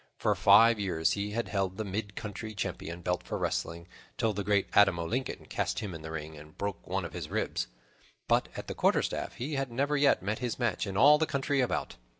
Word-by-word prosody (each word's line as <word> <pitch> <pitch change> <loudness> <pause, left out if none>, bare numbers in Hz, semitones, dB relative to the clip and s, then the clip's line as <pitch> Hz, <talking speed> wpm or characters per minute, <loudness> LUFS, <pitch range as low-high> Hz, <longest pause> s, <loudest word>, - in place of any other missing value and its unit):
For - - +2
five 110 +3 +6
years 85 -3 +1
he 100 +1 -1
had 115 +3 -2
held 95 -2 -1
the 110 - -2
mid 100 0 -4
country 110 0 -6
champion 85 -3 -4
belt 90 +1 0
for - - -4
wrestling, 85 +1 -2 0.3
till 110 -1 +1
the 100 0 -3
great 100 -1 +2
Adam 95 -3 +6
o' 85 - -2
Lincoln 130 +9 -3
cast - - -2
him 100 -4 -4
in 80 - -7
the 80 - -7
ring 80 0 -6
and 75 +1 -13
broke 100 -2 -4
one - - -1
of - - -8
his - - -5
ribs; - - -1 0.6
but - - +2
at - - -5
quarterstaff - - +1
he 140 +6 -4
had 135 -2 -2
never 140 +5 0
yet 140 -9 +3
met 105 +3 -2
his 125 -2 -2
match 120 -4 -1
in 95 -1 -3
all 150 +5 +7
the 160 - +1
country 140 0 +1
about. 125 - -2
100 Hz, 220 wpm, -30 LUFS, 90-120 Hz, 0.6 s, all